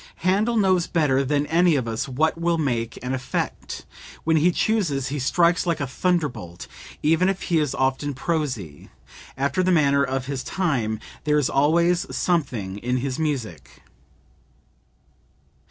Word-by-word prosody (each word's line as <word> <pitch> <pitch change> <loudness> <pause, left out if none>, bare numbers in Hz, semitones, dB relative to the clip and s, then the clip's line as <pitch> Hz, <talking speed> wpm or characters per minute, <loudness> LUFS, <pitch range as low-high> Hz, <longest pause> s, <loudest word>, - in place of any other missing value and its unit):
"Handel 210 +5 +2
knows 185 -4 +3
better 140 -5 +2
than 145 +1 0
any 170 +1 +3
of 130 -4 -1
us 115 +4 -3
what 155 +5 +1
will 170 0 0
make 120 -7 -1
an 125 +1 -2
effect; 130 0 -4 0.4
when 160 0 +2
he 165 +4 +4
chooses 165 - 0
he 145 +1 -3
strikes 170 +6 +2
like 170 -2 0
a 140 - -1
thunderbolt; 135 - -2 0.4
even 165 +5 +3
if 195 -1 -2
he 170 -3 +1
is 145 -3 -1
often 135 +1 0
prosy, 130 - -3 0.5
after 140 +7 0
the 185 0 +2
manner 140 -4 +4
of 130 -1 -2
his 135 -1 -3
time, 125 - -1 0.3
there 150 0 +3
is 145 - +1
always 170 +5 +2
something 115 - -1
in 125 +3 -1
his 130 +1 -3
music." 130 - -4
145 Hz, 150 wpm, -23 LUFS, 130-170 Hz, 0.5 s, he